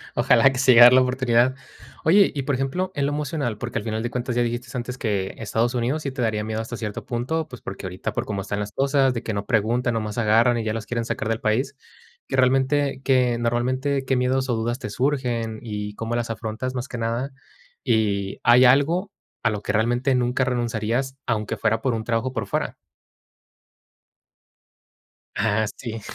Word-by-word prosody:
Ojalá, 120 +1 +5
que 130 - -5
se 130 -1 +5
llegue 120 -1 +8
a - - +13
dar 125 - +8
la 130 - +7
oportunidad. 125 -1 +2 0.5
Oye, 195 +5 +5
y 140 - -3
por 140 0 0
ejemplo, 155 +9 -2
en 140 - 0
lo 145 - 0
emocional, 145 -6 -2
porque, 120 +1 -4
al - - -8
final 110 0 -2
de 120 - -2
cuentas 125 0 -3
ya 120 - +2
dijiste 120 +1 -2
antes, 125 +1 -5
que 100 -6 -2
Estados 115 +2 -1
Unidos 130 +6 -1
sí 140 - -3
te 130 -1 -5
daría 110 -2 0
miedo 110 0 -2
hasta 115 +1 -6
cierto 105 -2 -5
punto, 150 +7 -2
pues, 125 -4 -11
porque, 95 0 -7
ahorita 95 +1 -4
por - - -2
cómo 100 -2 -3
están 100 +1 -4
las 105 0 -5
cosas, 135 +1 +2
de 115 - -4
que 110 - -3
no 100 0 -3
preguntan, 120 +3 +1
nomás 110 -1 -3
agarran, 115 +2 +3
y 115 - -2
ya 110 -1 -1
los 115 -1 -4
quieren 115 +1 -2
sacar 110 - -3
del 115 0 -1
país. 125 +6 0 0.5
Que - - -2
realmente 135 +1 +2
que 125 -3 +3
normalmente, 130 +4 0
¿qué 130 - +1
miedos, 130 +1 0
o, 120 - +2
dudas 120 +2 -2
te 105 - -5
surgen, 120 -3 -1
y 105 -2 -5
cómo 115 +2 -3
las 120 -1 -2
afrontas 115 +3 -4
más 125 0 -4
que 125 - -6
nada? 115 +4 -2 0.5
Y 100 -3 0
hay 125 +1 +6
algo, 160 +10 +3 0.3
¿a - - +3
lo 105 -2 -3
que 105 - -2
realmente 120 +4 +1
nunca 125 +1 +1
renunciarías, 120 +1 -1
aunque 110 -4 -2
fuera, 110 0 +1
por 130 -3 0
un 110 - -2
trabajo 120 +2 -1
por 110 -5 -3
fuera? - - -2 2.6
Ah, 110 0 +1
sí. 115 -3 -6
120 Hz, 205 wpm, -23 LUFS, 110-130 Hz, 2.6 s, a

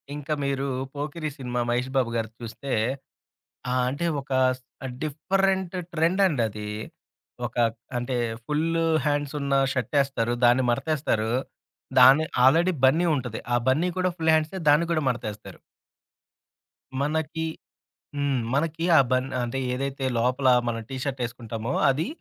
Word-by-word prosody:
ఇంకా 150 +1 -3
మీరు 140 0 -1 0.3
'పోకిరి' 150 +2 -4
సినిమా 125 -2 -3
'మహేష్ 125 +2 0
బాబు' 125 -3 +1
గారిది 115 -1 -3
చూస్తే 115 +5 -7 1.0
ఆ! - - +1 0.2
అంటే 140 +6 -3 0.2
ఒక 135 - -16 0.3
స్ 130 - -25 0.4
డిఫరెంట్ 190 +4 0 0.2
ట్రెండండది. 155 - +1 0.8
ఒక - - -6 0.4
అంటే 120 +1 -2 0.3
ఫుల్లు 165 +3 0 0.2
హ్యాండ్సున్న 145 -1 -1 0.2
షార్టేస్తారు. 130 -2 0
దాన్ని 120 +2 +5
మాడతేస్తారు. 120 -4 0 0.7
దాని 140 +4 +8 0.2
ఆల్రెడి 165 +7 +5
బన్నీ 160 +7 +5
ఉంటది. 125 -5 -4
ఆ - - +5
బన్నీ, 155 +8 +3
కూడా 185 0 +2
ఫుల్ 160 -1 +2
హ్యాండ్సే, 155 +4 +1
దాన్ని 150 +4 +5
కూడా 155 - +1
మడతేస్తారు. 110 -4 -5 1.4
మనకి 160 +2 -1 0.7
హ్మ్. 140 -2 +1
మనకి 160 +3 0
ఆ - - +8
బన్ 130 +1 +2 0.2
అంటే 120 +3 -3
ఏదైతే 135 +1 -3
లోపల 125 +3 +1 0.2
మనం 115 -1 -2
టీ 135 - -4
షర్ట్ 135 -2 -3
ఏసుకుంటామో, 115 0 -5 0.2
అది 140 +4 0
140 Hz, 125 wpm, -25 LUFS, 125-155 Hz, 1.4 s, దాని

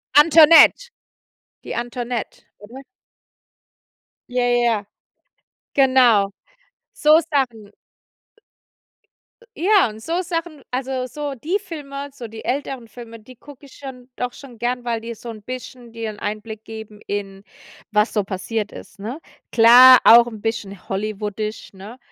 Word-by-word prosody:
Antoinette, 320 - +7 0.8
die - - -6
Antoinette, 240 -1 -5 0.2
oder? 235 +6 -12 1.5
Ja, 250 0 0
ja, 240 -3 +1 0.9
genau. 255 -7 +4 0.6
So 305 +1 +4
Sachen. 240 -8 -2 1.9
Ja 385 - +3
und 215 0 -11
so 335 +9 -2
Sachen 330 -4 -5
also, 255 0 -3
so 290 +1 -5
die 310 - -2
Filme, 285 -7 -8
so 250 -4 -9
die 220 0 -11
älteren 260 -2 -4
Filme, 230 +1 -12
die 250 +4 -16
gucke 285 +3 -15
ich 275 - -17
schon 255 -3 -10
doch 250 0 -3
schon 245 -4 -14
gerne, 245 +1 -2
weil 235 -2 -3
die 230 +1 -7
so 235 - -10
'n 220 -2 -9
bisschen 250 +1 -9
dir 225 -1 -5
'n 210 - -13
Einblick 215 +1 -6
geben 220 -1 -10
in 195 -1 -5 0.5
was 210 +1 +1
so 210 - +1
passiert 205 +3 -4
ist, - - -13
ne? 230 +9 -6 0.3
Klar, 245 +3 +8
auch 235 +1 +8
'n 220 -3 -8
bisschen 200 -4 -5
hollywoodisch, 210 +1 -5
ne, 200 +5 -11
240 Hz, 135 wpm, -20 LUFS, 215-270 Hz, 1.9 s, Klar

